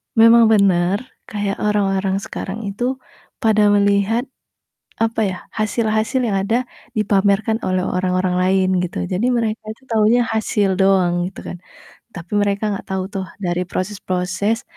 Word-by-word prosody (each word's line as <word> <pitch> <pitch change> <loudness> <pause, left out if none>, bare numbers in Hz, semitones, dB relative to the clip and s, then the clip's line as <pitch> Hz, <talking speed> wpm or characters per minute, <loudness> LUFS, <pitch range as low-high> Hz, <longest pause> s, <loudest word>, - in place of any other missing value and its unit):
memang 230 0 +7
bener 195 +1 +3 0.2
kayak 205 -2 -3
orang-orang 195 -2 +1
sekarang 210 +4 -6
itu 245 +6 -2 0.5
pada 215 -1 +4
melihat 200 +3 +2 0.8
apa 225 0 0
ya, - - -8 0.2
hasil-hasil 215 +3 0
yang 195 - 0
ada 235 +4 +1 0.3
dipamerkan 205 +1 +2
oleh 185 0 +1
orang-orang 185 0 0
lain 185 +1 +2 0.2
gitu. 90 - -4
Jadi 205 +7 0
mereka 225 -2 -1
itu 225 - -20
taunya 225 +2 +3
hasil 210 -3 0
doang 185 -2 +2
gitu 185 - -8
kan. - - -7 0.6
Tapi 175 +2 -9
mereka 205 +1 0
enggak 195 - -7
tahu 190 -1 -1
tuh 195 -2 -3 0.2
dari 175 0 0
proses-proses 190 +3 -2
200 Hz, 135 wpm, -19 LUFS, 185-220 Hz, 0.8 s, memang